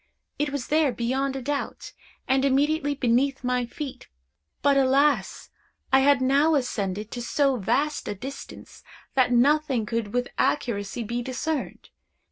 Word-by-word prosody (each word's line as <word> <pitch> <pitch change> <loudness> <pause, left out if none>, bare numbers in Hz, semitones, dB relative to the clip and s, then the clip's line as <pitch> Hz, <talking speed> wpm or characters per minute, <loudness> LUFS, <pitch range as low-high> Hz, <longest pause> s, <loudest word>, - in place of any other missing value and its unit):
It 295 0 +1
was 285 -3 -5
there, 305 -2 +3
beyond 265 +3 -1
a 265 - -5
doubt, 285 +1 -4 0.3
and 265 0 +2
immediately 290 +2 +1
beneath 265 +1 +1
my 250 -1 0
feet; 275 +2 -7 0.6
but, 285 0 +4
alas! 270 -5 +2 0.4
I 265 - +7
had 275 0 +4
now 285 +4 +3
ascended 210 -6 -2
to 245 - -5
so 270 +2 +1
vast 285 +8 -1
a - - -3
distance, 270 +7 -9 0.3
that 255 -2 +3
nothing 270 -1 +3
could 225 -2 -3
with 245 +1 -1
accuracy 220 -4 -1
be 235 +3 -3
discerned. 265 +4 -4
265 Hz, 140 wpm, -25 LUFS, 240-285 Hz, 0.6 s, I